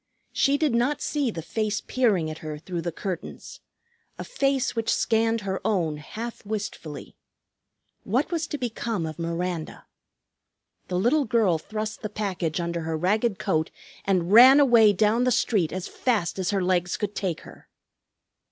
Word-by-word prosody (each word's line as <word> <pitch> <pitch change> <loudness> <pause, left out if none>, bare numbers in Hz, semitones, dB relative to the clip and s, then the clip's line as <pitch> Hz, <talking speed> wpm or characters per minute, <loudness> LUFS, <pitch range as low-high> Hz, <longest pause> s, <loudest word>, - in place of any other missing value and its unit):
She 280 0 +3
did 300 -4 +1
not 245 +5 +1
see 290 -4 -1
the 165 -7 -5
face 215 +3 -1
peering 210 -11 +1
at 155 - -8
her 155 -1 -6
through 175 +2 -5
the 170 +1 -3
curtains, 180 +1 -6 0.6
a - - -5
face 275 - 0
which 225 -1 -1
scanned 225 0 +1
her 190 -1 -3
own 165 -7 0
half 225 +10 -7
wistfully. 200 -8 -6 0.9
What 250 - 0
was 330 -1 -1
to 295 - -4
become 230 - -3
of 155 +1 -7
Miranda? 170 0 -4 1.0
The 180 - -2
little 270 +10 +2
girl 210 -8 +2
thrust 215 +5 -5
the 215 - -4
package 190 -7 -2
under 170 0 -2
her 160 0 -2
ragged 205 +5 +1
coat 160 +1 0 0.3
and 185 -2 0
ran 260 +5 +9
away 235 -6 +6
down 215 +4 +2
the 255 - +3
street 205 -8 +1
as 185 0 -4
fast 210 -8 -1
as 185 - -1
her 195 -2 0
legs 180 -1 0
could 205 -1 -3
take 185 -6 -3
her. - - -15
205 Hz, 160 wpm, -25 LUFS, 170-235 Hz, 1.0 s, ran